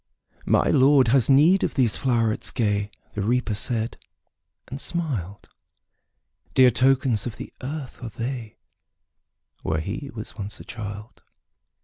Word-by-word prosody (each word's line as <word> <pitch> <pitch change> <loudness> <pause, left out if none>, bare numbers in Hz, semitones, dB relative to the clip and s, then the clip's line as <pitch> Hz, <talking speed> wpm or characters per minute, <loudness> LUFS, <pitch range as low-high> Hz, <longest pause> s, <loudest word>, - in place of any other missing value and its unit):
``My - - +3
Lord 135 -2 +5
has 130 +1 +3
need 155 +8 +5
of - - -1
these 125 -6 +2
flowerets 115 -4 0
gay,'' 105 -3 0 0.2
The 105 - -3
Reaper 120 +2 0
said, 115 +2 -1 0.7
and 135 +3 -6
smiled; 115 - -3 1.1
``Dear 130 -2 +6
tokens 130 -3 +2
of 115 - -6
the - - -9
earth 135 -1 -6
are 120 - -4
they, 115 0 -5 1.0
Where 80 0 -1
he 110 - -5
was 110 -2 -7
once 105 -1 -6
a - - -9
child. 105 0 -8
120 Hz, 130 wpm, -24 LUFS, 105-135 Hz, 1.1 s, ``Dear